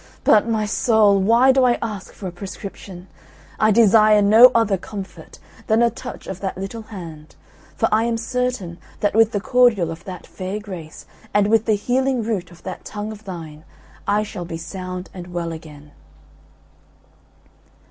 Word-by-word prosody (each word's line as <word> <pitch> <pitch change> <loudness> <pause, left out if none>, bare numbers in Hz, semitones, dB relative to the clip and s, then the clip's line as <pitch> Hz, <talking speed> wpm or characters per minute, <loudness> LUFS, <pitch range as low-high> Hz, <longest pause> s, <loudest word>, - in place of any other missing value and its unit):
But, 215 +2 +4
my 220 -2 0
soul, 210 -1 +3
why 230 +7 +5
do 260 0 +3
I 245 -1 +3
ask 210 -5 -5
for 195 - -11
a 185 - -3
prescription? 190 0 -9 0.5
I 215 - +4
desire 215 -1 +5
no 220 +5 +8
other 225 -4 +3
comfort 195 +1 -9 0.3
than 225 +1 +3
a 235 - +3
touch 245 +2 -9
of 190 -1 -6
that 195 -2 -4
little 195 +4 -6
hand; 165 -8 -10 0.4
for - - +1
I 220 +2 +3
am 235 -1 0
certain 230 -7 -3 0.2
that 205 - +1
with 225 +1 +4
the 205 - -1
cordial 220 -6 +3
of 165 - -9
that 185 -2 -8
fair 190 +3 -5
grace, 180 -7 -9 0.3
and 205 -1 +4
with 225 0 +3
the 220 - +3
healing 255 +3 0
root 205 -5 -3
of 175 -1 -17
that 185 0 -7
tongue 210 +1 -6
of 215 0 -11
thine, 160 -5 -8 0.4
I 210 +1 +2
shall 205 -3 -6
be 165 -1 -6
sound 185 +2 -7
and 180 -2 -8
well 170 -1 -3
again." 150 -2 -11
205 Hz, 170 wpm, -21 LUFS, 180-225 Hz, 0.5 s, no